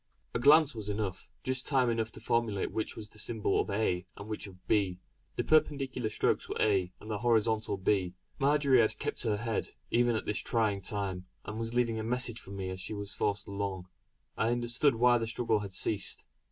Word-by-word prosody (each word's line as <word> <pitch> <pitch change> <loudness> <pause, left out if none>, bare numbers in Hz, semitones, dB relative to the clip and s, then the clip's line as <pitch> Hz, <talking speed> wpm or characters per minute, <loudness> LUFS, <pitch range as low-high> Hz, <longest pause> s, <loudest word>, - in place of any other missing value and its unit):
A - - 0
glance 150 +3 +6
was 110 -3 -6
enough, 100 -2 -3
just 130 0 -1
time 130 -3 +3
enough 115 -1 0
to - - -9
formulate 115 -4 0
which 110 - -2
was 110 - -8
the 110 - -13
symbol 110 -2 0
of - - -5
"a" 100 -3 0
and 100 - -8
which 110 -1 -4
of 95 -1 -15
"b." 95 -4 +2 0.4
The - - 0
perpendicular 135 -6 +2
strokes 105 - 0
were - - -3
"a" 95 -4 +2
and 110 - -8
the 105 - -2
horizontal 110 -2 +2
"b." 95 -2 +1 0.2
Marjory 140 -2 +4
had 110 -1 +1
kept - - -3
her 110 -3 +1
head, 115 0 -2 0.2
even 120 -1 +3
at 110 - -2
this 105 - -1
trying 105 -4 +1
time, 95 -2 -3 0.2
and 110 +1 -5
was 115 +1 -3
leaving 115 -2 +2
a - - -2
message 120 0 -1
for - - -14
me 95 -1 -4
as 95 0 -6
she 105 - -4
was 100 -1 -5
forced 100 -1 -1
along. 100 -2 -4 0.5
I 115 - +1
understood 120 +3 +2
why 120 +1 +5
the 115 - -2
struggle 115 -1 +1
had 100 -2 -6
ceased. 100 +2 0
110 Hz, 205 wpm, -31 LUFS, 100-120 Hz, 0.5 s, glance